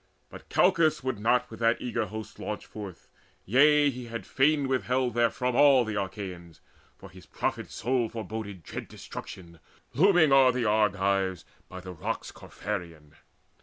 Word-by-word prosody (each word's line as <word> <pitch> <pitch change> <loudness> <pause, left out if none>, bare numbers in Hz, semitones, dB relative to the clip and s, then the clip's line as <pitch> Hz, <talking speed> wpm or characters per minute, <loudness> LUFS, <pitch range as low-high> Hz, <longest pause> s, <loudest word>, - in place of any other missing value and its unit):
But - - -12
Calchas 155 -3 +3
would 130 -5 -2
not 125 +3 +1
with 110 - -9
that 115 0 +2
eager 115 -3 -2
host 110 +2 -8
Launch 105 0 -5
forth; 100 -5 -10 0.4
yea, 145 +5 +5
he 125 -1 -8
had 115 0 -7
fain 140 +1 +2
withheld 130 -1 0
therefrom 120 +2 0
All 135 -3 +6
the 105 -2 -2
Achaeans, 95 -4 -7 0.4
for 95 - -12
his 90 0 -15
prophet - - -3
soul 120 0 -1
Foreboded 110 -4 -6
dread - - -7
destruction 85 -3 -10 0.3
looming 175 -2 +4
o'er 135 -1 +6
The 125 -1 -2
Argives 100 -3 +1 0.2
by 95 0 -8
the 90 0 -8
Rocks 80 - -4
Capherean. 80 -4 -7
115 Hz, 150 wpm, -28 LUFS, 95-130 Hz, 0.4 s, All